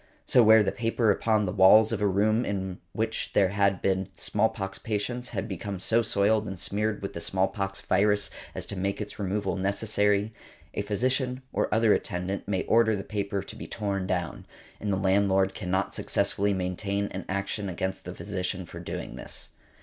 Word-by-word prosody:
So, 125 - +5
where 110 -1 +7
the 95 - 0
paper 115 +1 +1
upon 105 +1 +2
the 90 - -1
walls 105 +3 +6
of 110 -3 -2
a 105 - +3
room 105 +4 +2
in 95 -4 -3
which - - -2
there 95 -2 +4
had 100 -1 +1
been 95 -1 +1
smallpox 95 0 -1
patients 115 +3 -3
had 110 - -3
become 100 -1 -5
so 115 +5 +2
soiled 105 0 +2
and 95 -2 -6
smeared 105 +2 -2
with 100 - -4
the - - -5
smallpox 95 +1 -1
virus 105 +1 +2 0.2
as - - -3
to - - -4
make 100 +1 -2
its 105 0 -6
removal 100 0 -1
necessary, 105 +1 +1 0.4
a - - -1
physician 125 +5 0
or - - 0
other 110 -1 +4
attendant 90 +3 -2
may 95 -2 0
order 110 -1 +4
the 100 - -4
paper 100 -2 -2
to - - -9
be - - -8
torn 100 -3 -2
down; 90 -4 -3 0.3
and 105 - -2
the 95 - +1
landlord 95 0 +2
cannot 95 -1 -1
successfully 100 +1 0
maintain 100 +2 -1
an 95 0 -5
action 100 +1 -2
against 95 +1 -3
the 90 +1 -7
physician 95 -2 -3
for - - -9
doing - - -6
this. - - -6
100 Hz, 180 wpm, -27 LUFS, 95-105 Hz, 0.4 s, where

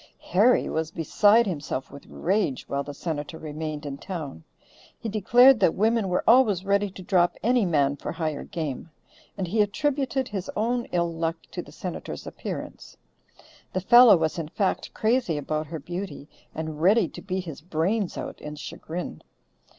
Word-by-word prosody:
Harry 215 +8 +4
was 160 -1 -2
beside 205 +8 +4
himself 150 -7 -4
with 140 0 -12
rage 190 -8 -1
while 140 - -1
the 145 - -6
Senator 155 +1 -5
remained 155 -1 -5
in 140 -1 -5
town; 155 - -6 0.6
he - - -5
declared 240 +4 +6
that 160 - +3
women 220 0 +2
were 180 - 0
always 220 -6 +5
ready 200 +1 +2
to 185 0 -11
drop 175 -1 +2
any 240 -2 +3
man 145 -4 +2
for - - -5
higher 155 -4 -3
game; 160 -4 -5 0.5
and 190 - -2
he 215 +3 +2
attributed 265 +4 0
his 195 -3 -5
own 240 +3 0
ill 170 -1 -1
luck 165 0 -1 0.2
to - - -4
the - - -14
Senator's - - -6
appearance. - - -7 0.8
The 185 - -1
fellow 240 0 +8
was 160 +1 -1
in 160 - -4
fact 190 +4 -1
crazy 220 -7 +1
about 155 +1 -2
her 160 - -5
beauty 175 -1 -6 0.3
and 160 -1 -5
ready 200 +2 +4
to - - -10
beat 185 -1 -3
his 155 -3 -8
brains 180 +5 -1
out - - -6
in 150 0 -7
chagrin. 160 - -6
180 Hz, 165 wpm, -26 LUFS, 155-210 Hz, 0.8 s, fellow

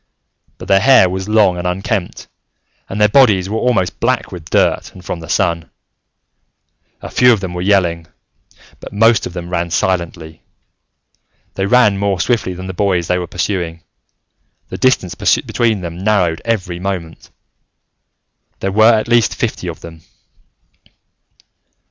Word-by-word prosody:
But - - -10
their 95 - +4
hair 130 -3 +5
was 95 +2 -4
long 105 -5 +3
and 90 - -3
unkempt, 95 +1 -3 0.6
and 100 - -5
their 105 - +5
bodies 105 -6 +4
were 110 - -1
almost 105 -8 0
black - - -1
with 85 -2 -9
dirt - - +1
and 90 -1 -13
from 90 - -4
the 80 -1 -11
sun. 85 -2 0 1.3
A - - -6
few 125 0 +5
of 115 - +2
them 95 -2 -5
were 90 - -4
yelling, 90 -4 +1 0.7
but - - -11
most 115 +1 +3
of - - -11
them 90 -1 -7
ran 85 -1 -1
silently. 85 -2 -2 1.1
They 95 0 -2
ran 105 -4 +3
more 100 -2 -1
swiftly 110 -6 0
than 90 +1 -8
the 95 - -6
boy 90 -2 0
they 90 +2 -1
were 90 - -5
pursuing: 85 -2 -3 0.9
the - - -6
distance 130 -9 +1
between 110 -4 0
them 85 0 -7
narrowed 95 -5 +1
every 95 -7 -2
moment. 90 -4 -5 1.3
There 95 - -2
were 110 +3 +5
at 110 +1 0
least 120 -2 +2
fifty - - -3
of - - -7
them. 80 -1 -11
95 Hz, 150 wpm, -16 LUFS, 85-105 Hz, 1.3 s, hair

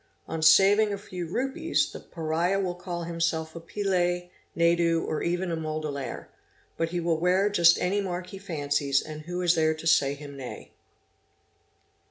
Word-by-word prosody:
On 160 - -4
saving 195 +7 +6
a 200 - -2
few 180 -4 -6
rupees, 270 - -1
the - - -8
Pariah 170 +4 -1
will 185 -2 -1
call 175 -1 -5
himself 165 -1 -2
a - - -5
Pillay, 175 -1 -1 0.2
Naidu, 170 0 +3
or 155 - -2
even 175 +1 -1
a - - 0
Mudaliar; 155 -3 -4 0.5
but 165 0 -1
he 175 +1 -2
will 165 -2 0
wear 185 +4 +2
just 170 -3 +6
any 195 +3 +1
mark 180 -2 -4
he 195 - -9
fancies, 145 -6 0
and 155 0 -8
who 175 +3 -4
is 175 -1 +4
there 160 -1 +2
to 155 +1 -10
say 140 -4 +3
him 145 0 -10
nay 130 -2 -8
170 Hz, 170 wpm, -27 LUFS, 160-180 Hz, 0.5 s, saving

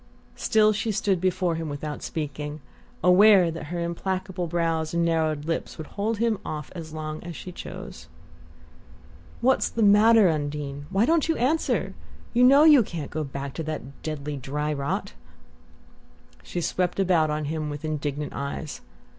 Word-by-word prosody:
Still 215 -1 +3
she 215 +2 -1
stood 200 -3 0
before 185 -1 +1
him 165 -1 -4
without 145 +1 -5
speaking, 150 -1 -5 0.4
aware 185 -1 +6
that 165 -1 -6
her 175 +3 -4
implacable 185 +1 -3
brows 165 -1 -1
and 170 0 +2
narrowed 160 -3 0
lips 165 0 -3
would 155 - -6
hold 210 +5 -2
him 225 -1 +1
off 150 -4 -6
as 165 -3 -8
long 155 0 -5
as 170 -1 -7
she 180 - -8
chose. 185 +2 -9 1.3
"What's 260 +2 +3
the 230 - -1
matter. 210 +1 +6
Undine? 145 -2 -3
Why 195 +4 +2
don't 325 +2 +2
you 325 - +2
answer? 290 +7 0 0.4
You 245 +1 +4
know 275 +4 +7
you 300 -4 +8
can't 165 -8 -5
go 155 0 -2
back 140 -1 -6
to 165 - -4
that 140 -3 -6
deadly 150 -2 -4
dry 150 +3 -2
rot!" 140 -1 -3 1.3
She 175 - -4
swept 180 +2 -1
about 175 -5 +3
on 150 0 -2
him 155 0 -3
with 145 +1 -6
indignant 150 -1 -3
eyes. 140 +2 -5
165 Hz, 160 wpm, -25 LUFS, 150-195 Hz, 1.3 s, you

